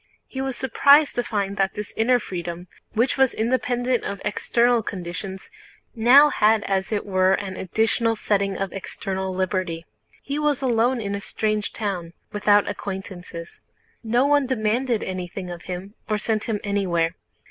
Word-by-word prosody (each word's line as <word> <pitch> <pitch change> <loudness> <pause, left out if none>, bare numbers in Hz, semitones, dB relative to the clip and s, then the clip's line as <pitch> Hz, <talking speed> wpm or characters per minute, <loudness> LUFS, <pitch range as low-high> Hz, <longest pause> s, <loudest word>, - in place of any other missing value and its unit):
He 265 - -6
was 265 -2 -3
surprised 280 +3 +5
to 245 - 0
find 200 -3 -2
that 195 0 +1
this 210 0 -6
inner 245 +3 +3
freedom, 175 -4 -6 0.3
which 240 +5 +1
was 265 -2 +4
independent 245 +1 0
of 200 -1 -4
external 235 +3 +2
conditions, 190 0 -6 0.4
now 260 +6 +7
had 215 0 +3
as 190 +1 -1
it 210 - -1
were 185 -1 +3
an 190 -2 -5
additional 225 +5 +1
setting 200 -2 0
of 195 -1 -3
external 190 0 -4
liberty. 185 -3 -2 0.4
He 280 +2 -3
was 295 -3 +1
alone 245 0 +2
in 200 -2 -3
a 200 - -3
strange 215 0 -1
town, 180 -6 -4 0.2
without 205 0 +3
acquaintances. 180 -3 -7 0.4
No 240 +4 +2
one 285 -2 +3
demanded 235 0 0
anything 185 0 -5
of 175 -1 -9
him 185 +2 -6 0.2
or 215 - +1
sent 215 0 -1
him 215 -3 -1
anywhere. 180 -5 0
210 Hz, 155 wpm, -23 LUFS, 190-240 Hz, 0.4 s, now